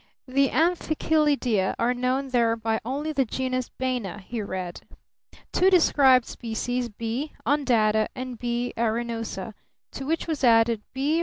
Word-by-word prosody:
"The 275 +1 +2
Amphichelydia 305 - +1
are 240 +2 +1
known 255 +2 -1
there 235 -3 +2
by 225 -1 -1
only 280 +6 -3
the 275 -2 +2
genus 255 +1 -2
Baena," 250 -7 -3
he 215 +3 -5
read. 185 -3 -5 0.7
"Two 370 - +4
described 275 -8 +5
species: 240 +1 -3
B. 230 +7 -4
undata 230 -7 +2
and 255 -2 -6
B. 240 0 -2
arenosa, 225 -2 -2 0.4
to 270 - -6
which 325 +1 0
was 315 -4 -3
added 230 -2 +4
B. 285 +5 0
250 Hz, 135 wpm, -25 LUFS, 225-275 Hz, 0.7 s, described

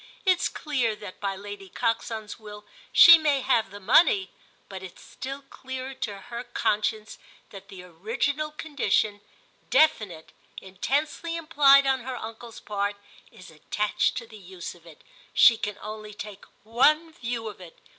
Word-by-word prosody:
It's 370 -2 +3
clear 255 -8 -1
that 205 -3 -10
by 200 -1 -2
Lady 200 0 -9
Coxon's 220 0 -3
will 210 -1 -11 0.3
she 335 -1 +10
may 290 -3 +1
have 230 -6 +1
the 200 +1 -10
money, 380 - +4 0.4
but 190 -1 -8
it's 190 -2 -11
still 275 +2 -8
clearer 260 0 -7
to 220 -6 -5
her 240 0 -7
conscience 215 -2 -2 0.3
that 195 -1 -11
the 190 -3 -11
original 230 - -2
condition, 280 -9 -1 0.5
definite, 205 - +2 0.3
intensely 285 - -2
implied 290 -4 +5
on 265 -1 +2
her 255 +1 -6
uncle's 225 0 -9
part, 205 0 -2 0.4
is 185 - -14
attached 210 +7 -1
to - - -5
the 220 -1 -13
use 185 -2 -8
of 170 -1 -19
it. 160 - -16 0.3
She 230 - +8
can 210 -2 -4
only 215 0 -8
take 210 -1 -9 0.2
one 305 +9 +3
view 235 -6 -4
of 210 -3 -9
it. 175 -2 -13
220 Hz, 150 wpm, -26 LUFS, 205-275 Hz, 0.5 s, she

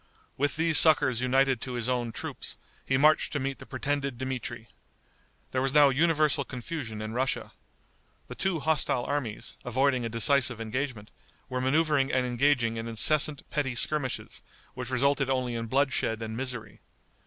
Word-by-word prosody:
With 140 0 0
these 160 0 +6
succors 130 -6 +5
united 130 -1 +2
to 130 - -5
his 120 -1 -3
own 120 -2 -1
troops, - - -6 0.3
he 135 - 0
marched 150 +3 +3
to 145 - -1
meet 135 0 -3
the - - -12
pretended 140 -3 -3
Dmitri. 125 -3 -5 0.8
There 130 - 0
was 135 +2 -1
now 145 -1 +7
universal 155 0 +2
confusion 125 -4 -6
in 110 +1 -5
Russia. 130 +2 -2 0.8
The - - -7
two 185 -5 -1
hostile 150 -5 +1
armies, 130 -7 -4
avoiding 130 +1 +1
a 115 - -3
decisive 125 +1 +2
engagement, 115 -1 -4 0.4
were 125 0 -2
maneuvering 145 0 +2
and 130 -1 +1
engaging 120 -2 +1
in 115 0 -5
incessant 145 +6 +1
petty 135 -4 -1
skirmishes, 135 +1 0 0.3
which 125 -1 -6
resulted 135 +1 +1
only 130 -2 -1
in 115 0 -4
bloodshed 130 -4 0
and 110 0 -5
misery. 125 -4 -6
130 Hz, 155 wpm, -28 LUFS, 120-145 Hz, 0.8 s, now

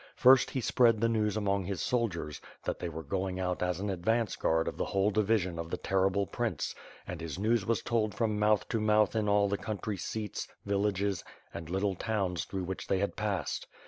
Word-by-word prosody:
First 130 +1 +6
he 130 - -2
spread 115 -1 +4
the 115 - +3
news 110 -2 +1
among 100 -2 0
his 95 -1 -3
soldiers, 95 - -1 0.2
that - - -2
they 85 - -3
were 80 0 -6
going 95 +4 -2
out 90 -1 -1
as 90 -1 0
an 100 +1 -1
advance 110 +4 0
guard 80 0 +1
of - - -2
the - - -1
whole 100 +2 +1
division 100 -4 +1
of 85 0 -4
the - - -2
terrible 95 +1 +1
Prince; 110 -6 -2 0.3
and 90 -2 -6
his 80 -1 -5
news 110 0 +1
was 115 -1 +1
told 110 -3 0
from 110 -3 0
mouth 105 0 +3
to 115 - 0
mouth 105 0 +3
in 105 -2 +1
all 100 0 +4
the 100 0 -1
country 105 -1 -3
seats, 105 +2 -4 0.2
villages, 100 -2 0 0.3
and 85 -1 -7
little 95 +2 0
towns 95 -3 -1
through 95 -1 -4
which 95 +1 -5
they 95 - +2
had 100 +2 -1
passed. 105 -3 -2
100 Hz, 210 wpm, -31 LUFS, 90-110 Hz, 0.3 s, First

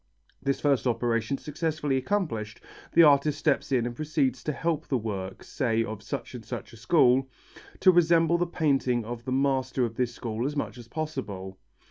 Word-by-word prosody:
This 140 0 0
first 135 -4 +2
operation 120 +1 0
successfully 150 -2 -2
accomplished, 130 - -2 0.3
the 170 - +7
artist 145 0 +5
steps 145 -2 0
in 125 -3 +2
and 120 0 -4
proceeds 140 -4 -1
to 150 - 0
help 160 +1 -2
the 130 - +1
work, 100 -4 -5
say 115 -5 0
of 110 -2 -6
such 125 +4 -5
and 120 -3 -7
such 115 - -7
a - - -12
school, 130 0 +3 0.5
to 185 - +7
resemble 170 -1 +4
the 175 - +1
painting 135 -8 +1
of 120 +1 -6
the 130 - -3
master 130 -1 +1
of 115 -1 -6
this 125 -2 0
school 120 +1 -3
as 145 - -4
much 140 -3 -3
as 120 - -11
possible. 115 -11 -5
130 Hz, 180 wpm, -27 LUFS, 115-150 Hz, 0.5 s, the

